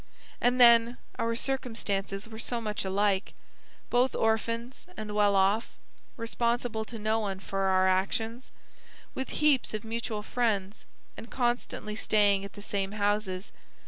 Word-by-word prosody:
And 245 +1 +2
then, 235 0 +6 0.2
our 230 0 0
circumstances 220 -6 -2
were 220 -1 -9
so 240 0 -2
much 215 -2 -3
alike, 195 +1 0 0.6
both 250 +1 +3
orphans, 230 +5 -1
and 210 -1 -5
well 205 -1 +3
off; 195 +4 +3 0.5
responsible 235 -1 -1
to 230 - -8
no 215 +1 0
one 195 -3 -3
for 195 0 -2
our 190 0 +4
actions; 220 +6 0 0.6
with 265 - -4
heaps 290 -7 +2
of 215 - -4
mutual 225 -1 -3
friends, 210 -4 -1 0.3
and 230 - -10
constantly 240 -4 -2
staying 205 -2 +3
at 200 - -8
the 205 - -10
same 200 -1 -2
houses. 205 -2 -1
220 Hz, 140 wpm, -29 LUFS, 200-235 Hz, 0.6 s, then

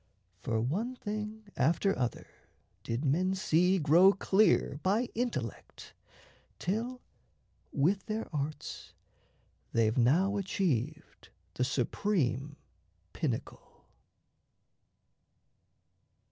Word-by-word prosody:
For 115 -1 -1
one 195 - -1
thing 215 -1 -5
after 170 +7 +2
other 125 -2 -2 0.6
did 120 +6 -3
men 180 +7 +2
see 185 -1 +3
Grow 175 +5 +6
clear 195 -7 +2
by 215 +6 +1
intellect, 155 - -4 0.6
till 235 +7 -3 0.7
with 180 +7 +1
their 220 +1 -3
arts 145 +1 -5 0.8
They've 115 -1 +2
now 180 - +3
achieved 155 - -2 0.2
the 125 - -1
supreme 140 - 0 0.6
pinnacle. - - -5
180 Hz, 80 wpm, -31 LUFS, 140-205 Hz, 0.8 s, Grow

